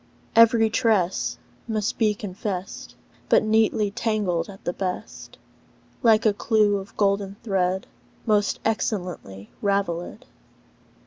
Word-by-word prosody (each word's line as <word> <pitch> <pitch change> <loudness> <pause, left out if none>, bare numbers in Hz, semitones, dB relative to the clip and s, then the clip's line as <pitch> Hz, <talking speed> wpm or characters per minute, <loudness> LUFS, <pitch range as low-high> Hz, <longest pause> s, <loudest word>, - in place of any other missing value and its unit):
Every 230 -1 +6
tress 195 -6 +1 0.3
must 215 -2 -2
be 215 -2 +3
confessed; 195 -1 -6 0.3
But - - +5
neatly 215 -1 +2
tangled 205 -6 -1
at 195 -1 -12
the 175 - -2
best; 185 -1 -6 0.6
Like 225 -1 +4
a 215 - +4
clew 210 -1 +2
of 195 0 -10
golden 200 -1 +1
thread 190 -3 0 0.4
Most 210 -2 +1
excellently 180 - -3
ravelled. 200 +2 -2
205 Hz, 110 wpm, -24 LUFS, 190-220 Hz, 0.6 s, Every